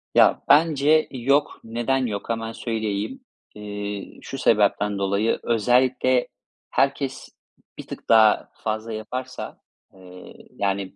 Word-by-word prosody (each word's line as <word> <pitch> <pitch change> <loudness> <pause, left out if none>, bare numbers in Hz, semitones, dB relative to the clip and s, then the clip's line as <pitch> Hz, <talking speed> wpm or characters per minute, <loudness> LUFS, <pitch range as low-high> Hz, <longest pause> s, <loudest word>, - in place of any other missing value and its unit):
Ya, - - +5
bence 155 0 +4
yok. 140 +3 +1
Neden 120 +3 -1
yok? 100 -2 -5
Hemen 115 -1 -2
söyleyeyim. 110 - -3 0.3
İii, 105 -1 -6
şu 135 - -7
sebepten 105 -4 +2
dolayı, 100 +3 0
özellikle 125 +2 +2 0.4
herkes 135 0 -1 0.5
bir - - -9
tık - - -10
daha 110 -2 +5
fazla 110 +1 -3
yaparsa, 110 +4 -6 0.4
eee, 90 -1 -13 0.2
yani, 100 -1 -2
115 Hz, 110 wpm, -23 LUFS, 105-130 Hz, 0.5 s, Ya